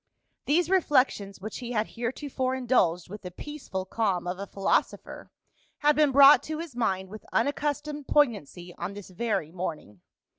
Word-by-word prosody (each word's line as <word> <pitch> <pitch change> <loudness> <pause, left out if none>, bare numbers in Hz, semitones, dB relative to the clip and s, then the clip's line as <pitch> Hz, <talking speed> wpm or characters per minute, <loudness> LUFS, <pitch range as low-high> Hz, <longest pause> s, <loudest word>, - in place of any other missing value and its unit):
These 320 +3 +2
reflections, 255 - +2
which 215 +3 -6
he 245 -1 -5
had 215 -1 0
heretofore 255 +2 -3
indulged 195 -10 +1
with 205 +3 -9
the 180 - -7
peaceful 195 -3 -6
calm 190 -4 -1
of 180 +1 -4
a 200 - -5
philosopher, 195 0 -1 0.5
had 295 0 +3
been 300 -1 +4
brought 280 +2 +8
to 310 0 -4
his 325 -5 -7
mind 190 -5 -1
with 215 +2 -10
unaccustomed 290 +2 -1
poignancy 190 - 0
on 180 +3 -4
this 205 -2 -10
very 185 -6 -2
morning. 155 - -6
230 Hz, 155 wpm, -27 LUFS, 185-285 Hz, 0.5 s, brought